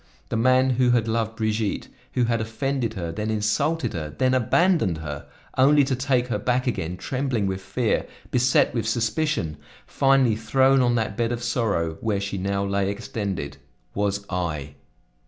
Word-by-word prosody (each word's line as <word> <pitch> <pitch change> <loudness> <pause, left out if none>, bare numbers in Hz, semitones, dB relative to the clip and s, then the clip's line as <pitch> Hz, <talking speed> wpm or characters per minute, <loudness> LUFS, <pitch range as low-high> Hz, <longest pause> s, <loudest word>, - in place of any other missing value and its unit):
The - - -2
man 130 +3 +4
who 125 0 +2
had 120 -2 +2
loved 115 0 -1
Brigitte, 110 -2 -1 0.3
who 125 - +2
had 115 -1 +1
offended 115 +1 -2
her, 85 -4 -3
then 105 +6 -3
insulted 110 +10 0
her, 75 -3 -4
then 130 - +1
abandoned 130 - +2
her, 75 -3 -6 0.3
only 145 +2 +6
to 135 -1 0
take 130 -1 +1
her 120 - -1
back 125 0 0
again, 90 -8 -2
trembling 130 -1 -1
with 95 0 -2
fear, 105 +5 -1 0.2
beset 125 0 +3
with 115 -2 -1
suspicion, 115 - -1 0.3
finally 135 -4 +3
thrown 130 +4 +3
on 120 -1 +2
that 110 -3 -1
bed 115 +1 0
of 120 0 -3
sorrow, 100 -10 -1
where 105 -3 0
she 100 0 -3
now 100 +1 -1
lay 100 0 0
extended, 100 -6 -4 0.4
was 100 0 -1
I!" 80 -6 -3
115 Hz, 165 wpm, -24 LUFS, 100-130 Hz, 0.4 s, only